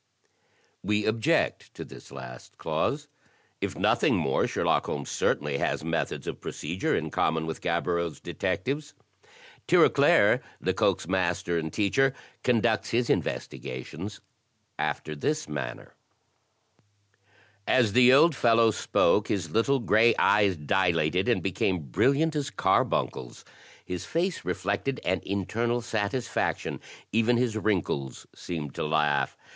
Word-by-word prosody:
We 105 +2 0
object 110 0 0
to - - -7
this - - -13
last 65 -2 -10
clause. 135 - -2 0.5
If - - -3
nothing - - +2
more, 65 - +1
Sherlock - - 0
Holmes - - -4
certainly 70 -1 0
has - - -1
methods 80 +1 -2
of - - -6
procedure 85 +6 -2
in - - -2
common 80 0 0
with 80 - -5
Gaboriau's 85 -1 -1
detectives. 135 - -3 0.7
Tirauclair, - - +5 0.2
Lecoq's - - 0
master 90 -2 0
and 80 -1 -4
teacher, 135 - +1 0.3
conducts 110 -3 +1
his 120 +1 +1
investigations 80 +11 -4 0.6
after 75 - -2
this 150 - -2
manner: 70 -5 -6 1.7
As 120 -6 +3
the 125 +1 +6
old 155 +5 +6
fellow 115 -2 +4
spoke, 105 0 +2
his 85 -6 -2
little 125 - +2
gray 115 -1 +4
eyes 100 -3 +3
dilated, 90 +3 +1
and 120 - +1
became 95 0 0
brilliant 140 - +1
as 145 -1 -1
carbuncles. 60 - -1 0.4
His 90 -1 -5
face 175 +2 -1
reflected 100 +9 -2
an 95 +1 0
internal 115 +5 -1
satisfaction; 115 +1 -2 0.3
even 115 +2 +3
his 120 -2 0
wrinkles 90 - -2
seemed 75 -5 -6
to - - -3
laugh. 75 -1 +1
100 Hz, 120 wpm, -27 LUFS, 80-120 Hz, 1.7 s, the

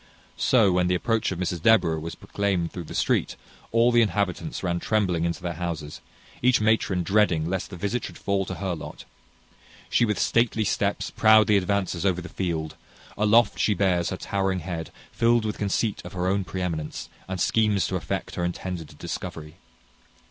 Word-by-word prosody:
So 115 -7 +4
when 90 0 +2
the 90 - +2
approach 110 +3 0
of 95 - -3
Mrs 90 -2 -2
Deborah 85 -7 +4
was 80 +1 -6
proclaimed 95 -5 -2
through 90 -3 -6
the - - -8
street, - - +1 0.4
all 115 +2 +4
the 120 0 +5
inhabitants 105 -6 -1
ran 85 -1 0
trembling 90 -6 0
into 85 - -3
their 85 -1 -2
houses, 80 -4 -4 0.4
each 125 0 +4
matron 105 -4 +1
dreading 95 -5 +2
lest 95 +1 -2
the 95 - -8
visit 100 +6 -2
should - - -9
fall 100 -1 0
to - - -4
her 95 -2 -2
lot. 80 - -8 0.9
She - - +3
with 105 -4 +1
stately 115 0 +2
steps 100 0 -1
proudly 110 -1 +5
advances 95 -2 0
over 95 -3 +1
the 90 - -8
field: 80 -4 -3 0.4
aloft 105 +2 +3
she 105 - +2
bears 90 -3 +1
her 95 - -4
towering 95 -1 -1
head, 80 -2 -5 0.2
filled 115 -1 +2
with 105 - -3
conceit 105 +1 -1
of - - -9
her 90 -1 -2
own 95 +1 +1
pre 95 0 -4
eminence, 80 -4 -4 0.2
and 95 0 -4
schemes 105 -2 +2
to - - -2
effect - - -3
her 90 - -3
intended 90 -2 -5
discovery. 75 -1 -6
95 Hz, 180 wpm, -25 LUFS, 85-105 Hz, 0.9 s, the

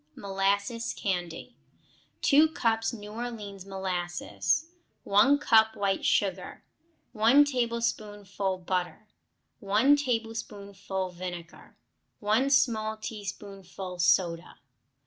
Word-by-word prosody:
Molasses 200 +4 -1
Candy 175 -4 -4 0.7
2 300 +2 +6
cups 225 -3 0
New 210 -3 -9
Orleans 210 -4 -7
molasses. 180 - -2 0.4
1 210 +9 +4
cup 220 -6 +4
white 195 -1 -1
sugar. - - -1 0.5
1 240 +6 +5
tablespoonful 215 -6 -2
butter. 180 +3 -2 0.5
1 215 +8 +4
tablespoonful 205 -6 -4
vinegar. 175 -1 -9 0.4
1 220 +6 +2
small 225 -6 +2
teaspoonful 195 -3 -7
soda. 175 -1 +1
205 Hz, 85 wpm, -28 LUFS, 190-230 Hz, 0.7 s, 2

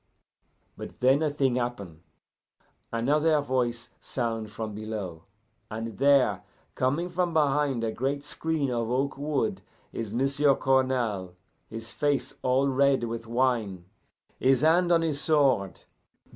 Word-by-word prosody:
But - - -9
then 135 +4 +4
a 155 - +2
thing 135 -3 0
happen. 100 -10 -4 0.9
Another 150 +7 +2
voice 120 -4 -1
sound 115 -3 -3
from 110 0 -6
below, 100 -6 -6 0.4
and 115 0 -6
there, 140 -1 +4 0.3
coming 145 +7 0
from 175 -1 -1
behind 145 -4 +2
a 115 - 0
great 140 +5 -2
screen 150 -2 -2
of 115 -2 -1
oak 135 +3 0
wood, 150 +8 -1 0.3
is 110 -3 -4
M'sieu' 135 +4 +2
Cournal, 125 -9 0 0.3
his 115 0 -6
face 140 -4 0
all 130 +2 +2
red 135 -1 +2
with 115 0 -4
wine, 115 -7 0 0.5
his 130 0 +3
hand 170 +3 +4
on 165 -1 +4
his 150 -3 -1
sword. 140 - +2
130 Hz, 130 wpm, -27 LUFS, 115-145 Hz, 0.9 s, then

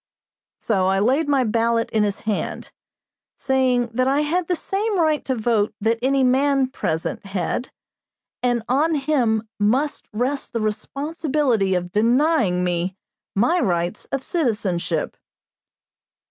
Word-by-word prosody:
So 190 -4 +1
I 190 0 +2
laid 265 +9 +2
my 275 -2 +3
ballot 230 0 +1
in 220 - +2
his 205 -1 -1
hand, 215 -2 -3 0.7
saying 255 -3 +1
that 255 +2 +1
I 275 +2 +2
had 330 +3 0
the 360 - +1
same 400 +3 -1
right 310 -2 +2
to 260 - 0
vote 220 -2 0
that 225 +2 +1
any 270 +1 +2
man 270 +1 +3
present 160 -10 -3
had, 195 +6 -2 0.7
and 245 -2 +1
on 300 +6 +2
him 245 -7 +1
must 255 +9 0
rest 255 +6 -2
the 230 - 0
responsibility 265 - 0
of 180 0 -2
denying 230 - +2
me 180 +1 -1 0.4
my 280 - +3
rights 175 - -1
of 275 -1 -3
citizenship. 205 - -1
245 Hz, 135 wpm, -22 LUFS, 210-280 Hz, 0.7 s, my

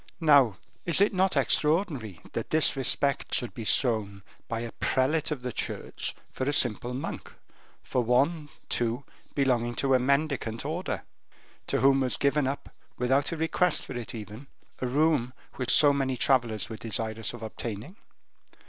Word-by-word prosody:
Now, 140 - +5 0.3
is 170 - +2
it 200 +1 +4
not 185 -3 +2
extraordinary 140 - +1
that - - -3
this 155 -1 +4
respect 135 +1 +1
should 120 - -1
be 115 - -6
shown 105 -5 +1 0.2
by 115 -1 -3
a 120 -1 -5
prelate 140 +4 0
of 145 -5 -4
the 125 - -3
Church - - -4 0.2
for 130 - -3
a - - 0
simple 120 -1 +1
monk, 135 - -5 0.5
for 125 - 0
one, 145 +6 +1 0.2
too, 120 +3 -1 0.3
belonging 120 -4 +1
to 135 +2 +1
a 130 - +5
mendicant 140 -3 0
order; 170 +5 -3 0.6
to - - 0
whom 135 0 +5
was 130 -2 0
given 140 0 +2
up, 140 +1 -4 0.3
without 135 +5 +1
a 165 - -3
request 165 +3 +1
for - - -7
it 120 -1 -5
even, 110 +5 -9 0.3
a 130 - -1
room 140 -2 +2 0.2
which 125 -2 -2
so 145 -1 +6
many 135 -2 -1
travelers 120 -5 +1
were 110 - -7
desirous 110 -1 -2
of 120 -2 -9
obtaining? 110 - -6
130 Hz, 160 wpm, -28 LUFS, 115-145 Hz, 0.6 s, so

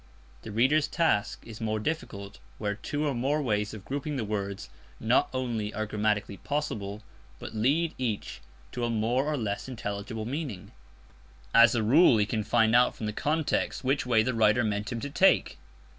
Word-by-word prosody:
The - - -8
reader's 135 +8 +3
task 165 -12 0
is 115 -1 -10
more 110 -1 -1
difficult 100 -7 -4 0.2
where 105 -1 -2
two 145 +8 -3
or 145 - 0
more 135 +5 0
ways 105 -6 0
of 105 -3 -10
grouping 145 +2 -3
the 130 - -1
words 100 -1 -4 0.3
not 115 +4 +2
only 120 -5 -2
are 110 - -1
grammatically 105 -1 -1
possible, 105 -8 -3 0.3
but - - -8
lead 145 +9 +1
each 115 - -3 0.3
to 125 - -4
a 120 - 0
more 115 +4 +1
or 150 0 -1
less 105 -3 -3
intelligible 110 -1 -5
meaning. 130 - -5 0.8
As 115 0 +7
a 110 - +1
rule 130 +2 +6
he 105 - +3
can 110 0 -2
find 115 0 +3
out 125 +1 +4
from 110 - -5
the 105 - -2
context 155 +4 -1
which 135 0 0
way 115 -3 +4
the 130 +3 -1
writer 110 +1 +3
meant 105 +1 -2
him 120 - -3
to 145 - -4
take. 190 +6 +3
115 Hz, 180 wpm, -28 LUFS, 105-135 Hz, 0.8 s, As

